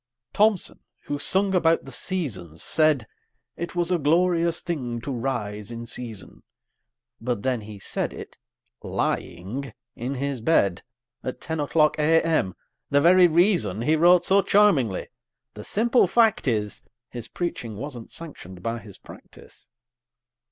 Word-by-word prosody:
Thompson, 210 -3 +2 0.2
who 145 - -4
sung 190 +5 +2
about 165 -2 +3
the 135 - -9
"Seasons," 110 - -3
said 155 -7 +2 0.5
It 170 +1 -6
was 175 0 0
a 180 - +2
glorious 170 +2 +2
thing 125 -9 -3
to 140 - -5
rise 115 -5 -3
in 115 0 -6
season; 115 -3 -6 0.8
But 115 -3 -2
then 125 -3 0
he 105 0 -10
said 95 - -3
it - - -10 0.5
lying 110 +9 -3 0.2
in 125 +4 -4
his 135 -2 -3
bed, 100 - +2 0.4
At 130 - -5
ten 160 -1 -4
o'clock 150 +1 +2
A.M., 160 - +2 0.3
the 140 - +4
very 180 +4 +6
reason 165 - +2
He 155 +5 +3
wrote 175 +2 +5
so 195 +1 +4
charmingly. 165 - +3 0.4
The 105 - -9
simple 230 - +2
fact 225 -4 +3
is 105 -4 -1 0.3
His 120 -2 -7
preaching 120 - -4
wasn't 125 -2 -7
sanctioned 95 - -11
by 115 0 -2
his 100 -4 -12
practice. - - -15
140 Hz, 135 wpm, -25 LUFS, 115-170 Hz, 0.8 s, very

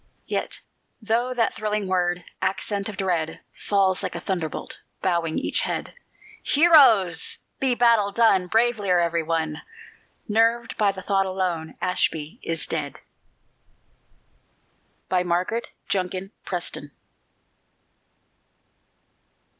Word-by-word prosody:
Yet - - -3 0.4
though 230 +3 0
that 230 -2 +1
thrilling 210 -1 -2
word 180 -1 0 0.2
Accent 200 +1 -1
of 205 - -8
dread 175 -5 -1 0.3
Falls 195 -2 +2
like - - -3
a - - -3
thunderbolt, 175 -5 -3 0.2
Bowing 170 -3 0
each - - 0
head, - - -3 0.5
Heroes! 270 - +5 0.2
be 260 -2 +3
battle 230 -4 +4
done 200 -4 +3
Bravelier 215 -3 +2
every 170 -1 +1
one, 160 -1 -2 0.7
Nerved 230 +2 +2
by 205 -2 +3
the 190 -1 -9
thought 195 -1 +1
alone 180 -4 -2
Ashby 175 +1 -1
is 165 -1 -1
dead! 145 -4 -3 2.1
MARGARET 180 +5 0 0.2
JUNKIN 185 0 -2
PRESTON. 175 -5 -2
190 Hz, 100 wpm, -24 LUFS, 175-220 Hz, 2.1 s, Heroes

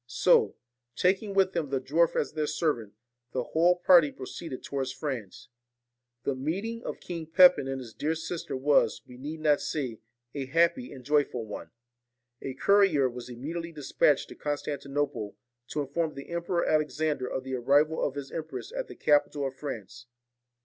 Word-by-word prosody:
So, 465 -2 +3 0.4
taking 195 +4 +1
with 190 -1 +3
them 160 -5 -1
the 135 -1 0
dwarf 155 +6 +2
as 145 - -2
their 155 -1 -1
servant, 145 -9 -1 0.4
the 130 - 0
whole 170 +7 +3
party 175 -4 +6
proceeded 130 +1 -7
towards 135 -2 -2
France. 130 -7 -5 0.7
The 140 - 0
meeting 195 - -3
of - - -5
King 170 -3 -6
Pepin 175 -3 +6
and 135 0 -3
his 120 -4 -9
dear 155 +2 -1
sister 165 -3 -4
was, 140 +2 +3
we 125 - -13
need 155 +4 -6
not 150 -2 +3
say, 130 -8 -3 0.3
a 140 -2 -4
happy 170 - +2
and 130 -3 -11
joyful 145 -5 +1
one. 105 - -7 0.7
A 130 - -5
courier 195 -6 +4
was 125 0 -8
immediately 165 +8 -5
despatched 145 -1 +1
to - - -10
Constan 145 0 -3
tinople 140 -7 -2 0.3
to 150 - -2
inform 155 +3 -2
the 140 - -9
Emperor 170 +1 -1
Alexander 155 -3 0
of 130 - -3
the 130 0 -5
arrival 145 +5 +3
of 140 - -1
his 140 -1 -6
empress 160 - -6
at - - -4
the - - -10
capital 145 -1 +2
of 135 - -3
France. 120 -4 -7
145 Hz, 170 wpm, -28 LUFS, 130-165 Hz, 0.7 s, party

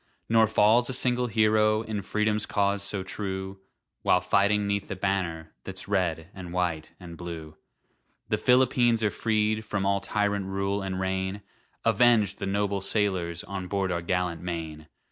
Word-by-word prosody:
Nor 115 0 +4
falls 110 +4 +4
a - - -2
single 125 -1 +2
hero 110 -1 +3
In 110 -2 -3
Freedom's 105 +2 0
cause 100 -1 +1
so 100 -1 -3
true, 95 0 -5 0.4
While 90 - +4
fighting 100 +2 +2
'neath 100 0 -1
the - - -4
banner 90 -4 -2
That's 95 0 -7
red 90 -4 0
and 90 -3 -8
white 85 -3 -2
and 85 -2 -9
blue. 80 -3 -7 0.7
The - - +1
Philippines 125 -2 +3
are 105 - +2
freed 110 0 0
from 100 -3 -2
All 100 0 +2
tyrant 100 0 -1
rule 100 +1 -1
and 95 -1 -3
reign, 95 +1 -2 0.4
Avenged 110 -6 +3
the 100 - -3
noble 100 0 0
sailors 95 -5 -1
On 95 -1 -5
board 95 -1 -1
our 85 -1 -1
gallant 90 -1 -1
Maine! 80 -3 -5
100 Hz, 160 wpm, -27 LUFS, 90-105 Hz, 0.7 s, Nor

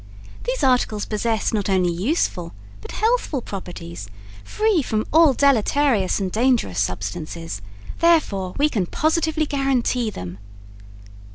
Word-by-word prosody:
These - - -2
articles 245 -5 +2
possess 220 +1 -1
not 205 -2 -1
only 185 -2 +2
useful, 180 - -1 0.3
but - - -9
healthful 445 - +1
properties, 135 - -7 0.4
free 425 - +1
from 220 -5 -1
all 320 -2 +7
deleterious 270 -6 +2
and 190 -2 -2
dangerous 230 - +1
substances, 105 - -4 0.4
therefore, 210 - +2
we 290 - +4
can 205 -11 -1
positively 315 - +1
guarantee 265 -4 0
them. 90 - -7
220 Hz, 115 wpm, -22 LUFS, 180-290 Hz, 0.4 s, all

